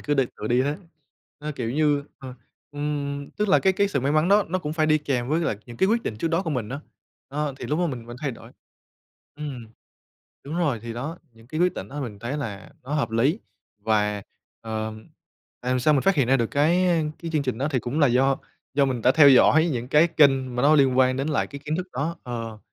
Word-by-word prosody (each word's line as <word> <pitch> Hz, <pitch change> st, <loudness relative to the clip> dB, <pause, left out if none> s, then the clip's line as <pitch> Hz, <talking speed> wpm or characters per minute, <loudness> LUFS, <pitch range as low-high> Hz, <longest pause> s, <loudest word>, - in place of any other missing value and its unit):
cứ 145 Hz, -, -1 dB
đi 135 Hz, -2 st, +3 dB
tự 105 Hz, -, -5 dB
đi 125 Hz, +2 st, +3 dB
thế. 145 Hz, +2 st, -1 dB, 0.6 s
Ơ, 150 Hz, 0 st, -5 dB
kiểu 115 Hz, -3 st, -3 dB
như, 145 Hz, 0 st, +1 dB
ờ, 130 Hz, -2 st, -9 dB, 0.4 s
ừm, 145 Hz, -1 st, -3 dB
tức 210 Hz, -1 st, -2 dB
là 190 Hz, -, +6 dB
cái 190 Hz, -, +3 dB
cái 200 Hz, +1 st, +1 dB
sự 165 Hz, -, -1 dB
may 140 Hz, +3 st, 0 dB
mắn 155 Hz, +3 st, +3 dB
đó 205 Hz, +1 st, +5 dB
nó 185 Hz, -, 0 dB
cũng 150 Hz, -4 st, -4 dB
phải 155 Hz, -1 st, +1 dB
đi 155 Hz, 0 st, +4 dB
kèm 130 Hz, -4 st, -2 dB
với 160 Hz, +3 st, +1 dB
lại 135 Hz, -11 st, -1 dB
những 120 Hz, -1 st, -10 dB
cái 190 Hz, -, +2 dB
quyết 230 Hz, +1 st, +2 dB
định 105 Hz, -, -4 dB
trước 165 Hz, -, -1 dB
đó 170 Hz, +3 st, +1 dB
của 165 Hz, -, -3 dB
mình 125 Hz, -7 st, -2 dB
á, 140 Hz, +3 st, -5 dB, 0.5 s
ơ, 145 Hz, 0 st, -3 dB
thì -, -, -6 dB
lúc 150 Hz, +3 st, -1 dB
đó 180 Hz, -, +2 dB
mình 125 Hz, -7 st, -5 dB
mình 120 Hz, +1 st, -8 dB
thay 145 Hz, -3 st, -1 dB
đổi 115 Hz, -, -12 dB, 0.9 s
ừm, 140 Hz, -6 st, -6 dB, 0.8 s
đúng 150 Hz, +5 st, -5 dB
rồi, 145 Hz, -10 st, 0 dB
thì 115 Hz, -1 st, -5 dB
đó, 150 Hz, +9 st, -5 dB
những 115 Hz, 0 st, -19 dB
cái 155 Hz, +5 st, -4 dB
quyết 180 Hz, 0 st, +3 dB
định -, -, -6 dB
đó 145 Hz, +2 st, -6 dB
mình 110 Hz, -7 st, -6 dB
thấy 120 Hz, +6 st, -4 dB
là 110 Hz, -8 st, -6 dB
nó 140 Hz, +4 st, -4 dB
hợp 120 Hz, -7 st, 0 dB
lý, 135 Hz, -, +2 dB, 0.5 s
và, 105 Hz, -2 st, +1 dB, 0.4 s
ờm, 110 Hz, -1 st, -5 dB, 0.5 s
làm 125 Hz, 0 st, 0 dB
sao 150 Hz, +4 st, +4 dB
mình 135 Hz, -, +2 dB
phát 195 Hz, -, +3 dB
hiện 135 Hz, -7 st, +1 dB
ra 135 Hz, -, +5 dB
được 115 Hz, -3 st, 0 dB
cái, 170 Hz, +6 st, +3 dB
a, 170 Hz, -3 st, +2 dB, 0.2 s
cái 165 Hz, -1 st, -6 dB
chương 150 Hz, -, +1 dB
trình 130 Hz, -4 st, -3 dB
đó 140 Hz, +3 st, 0 dB
thì 130 Hz, -, +1 dB
cũng 125 Hz, +5 st, -3 dB
là 145 Hz, -, +6 dB
do 130 Hz, +2 st, +3 dB, 0.4 s
do 140 Hz, -1 st, +4 dB
mình 125 Hz, -4 st, -2 dB
đã 130 Hz, -, +5 dB
theo 150 Hz, -2 st, +7 dB
dõi 150 Hz, +5 st, +6 dB
những 125 Hz, -1 st, -4 dB
cái 150 Hz, +4 st, +5 dB
kênh 135 Hz, -5 st, +3 dB
mà 125 Hz, -, 0 dB
nó 150 Hz, +2 st, +6 dB
liên 135 Hz, -3 st, +4 dB
quan 130 Hz, 0 st, +4 dB
đến 135 Hz, +3 st, -2 dB
cái -, -, +1 dB, 0.2 s
kiến 155 Hz, +2 st, -1 dB
thức 180 Hz, -, -3 dB
đó 160 Hz, +6 st, -2 dB
ờ, 115 Hz, -3 st, -6 dB
140 Hz, 250 wpm, -24 LUFS, 125-155 Hz, 0.9 s, theo